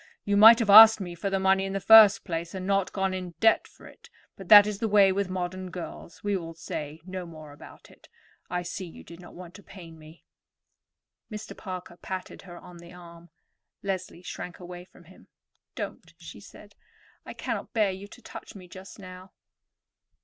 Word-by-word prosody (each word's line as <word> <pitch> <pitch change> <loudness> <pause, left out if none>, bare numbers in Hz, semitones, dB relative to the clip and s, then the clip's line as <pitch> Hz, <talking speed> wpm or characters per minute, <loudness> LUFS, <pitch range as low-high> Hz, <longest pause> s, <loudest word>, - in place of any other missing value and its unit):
You 205 - 0
might 220 +3 +8
have 230 -3 -2
asked 220 +1 +9
me 180 -3 -7
for 175 +4 -5
the 195 0 -1
money 190 0 +2
in 195 0 -5
the 195 - -2
first 220 0 +6
place, 170 0 -5
and 185 -1 -6
not 195 -1 -1
gone 190 -1 -2
into 180 -3 -7
debt 225 - +2
for - - -20
it; - - -17 0.3
but 195 - -12
that 205 -1 +9
is 210 -1 -5
the 225 - -2
way 200 -2 +4
with 195 0 -2
modern 185 0 -5
girls. 170 -1 -10
We 205 -1 -1
will 165 -3 -7
say 155 -1 -8
no 185 -1 -7
more 155 -3 -13
about 145 - -16
it. - - -22 0.4
I 180 0 -3
see 180 +1 -7
you 165 - -14
did 170 0 -14
not 180 - -15
want 180 -1 -12
to 205 - -14
pain 170 -5 -14
me." 155 +2 -17 1.1
Mr. 215 0 -9
Parker 185 -2 -9
patted 185 0 -8
her 175 -3 -13
on 175 0 -14
the 170 0 -14
arm. 170 -1 -15 0.5
Leslie 185 -2 -5
shrank 180 0 -9
away 180 0 -11
from 180 - -21
him. 185 +3 -20 0.5
"Don't," - - -8
she - - -12
said. - - -16 0.5
"I - - -11
cannot - - -5
bear 215 -4 +1
you 190 +2 -10
to - - -17
touch - - -12
me 185 -2 -13
just 190 +2 -13
now." 185 -1 -13
185 Hz, 200 wpm, -26 LUFS, 175-195 Hz, 1.1 s, asked